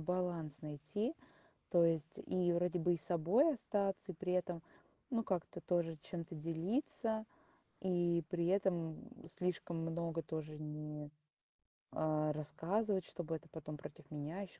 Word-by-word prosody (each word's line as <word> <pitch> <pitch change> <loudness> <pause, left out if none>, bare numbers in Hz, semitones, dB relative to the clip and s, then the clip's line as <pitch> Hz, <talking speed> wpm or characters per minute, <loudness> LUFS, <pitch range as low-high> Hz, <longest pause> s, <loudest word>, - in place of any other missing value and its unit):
баланс 170 -3 -1
найти. 155 - -2 0.6
То 170 -1 +7
есть, 165 -2 +2
и 180 -1 +3
вроде 180 +1 +2
бы 175 +1 +4
и - - 0
собой 180 - +4
остаться, 195 -5 0
и - - -11
при 180 +2 -1
этом, 175 -2 +1 0.5
ну, 235 -3 +2
как-то 185 -6 -1
тоже 170 -2 +1
чем-то 170 -1 -5
делиться, 220 - 0 0.6
и 175 -2 +3
при 170 -2 +1
этом, 175 -4 +2
м, 165 - -12
слишком 180 -1 0
много 165 0 -1
тоже 155 -1 -4
не 150 -1 -4 0.9
а 155 -1 +3
рассказывать, 185 +6 +1
чтобы 165 -2 -3
это 160 - -16
потом 155 -1 -6
против 145 - -10
меня 150 +5 -3
еще 195 - -8
170 Hz, 140 wpm, -38 LUFS, 155-185 Hz, 0.9 s, То